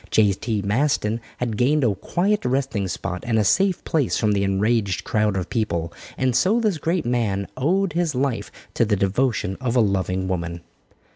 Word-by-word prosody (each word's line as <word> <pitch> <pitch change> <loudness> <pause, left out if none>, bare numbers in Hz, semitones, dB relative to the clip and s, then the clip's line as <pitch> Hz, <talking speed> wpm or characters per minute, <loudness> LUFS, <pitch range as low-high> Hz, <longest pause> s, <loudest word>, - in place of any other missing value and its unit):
J.T. 105 0 +1
Maston 115 0 0 0.2
had 115 -4 -2
gained 140 +5 +2
a 115 -4 +3
quiet 195 - 0
resting 125 -6 -1
spot 90 0 -4
and 115 -2 +2
a 110 - +3
safe 190 - +2
place 150 -6 0
from 105 -2 +1
the 100 -1 +1
enraged 100 0 +1
crowd 105 -2 +1
of 90 - -2
people, 85 -7 -2 0.2
and 130 -2 +1
so 205 - +3
this 210 -8 0
great 165 +1 -1
man 110 -5 0
owed 180 +5 +1
his 170 -4 0
life 130 -2 -1 0.2
to - - +2
the 105 -2 +2
devotion 100 0 0
of 125 -2 -1
a - - +5
loving 95 -3 0
woman. 85 -2 -3
115 Hz, 175 wpm, -23 LUFS, 100-135 Hz, 0.2 s, a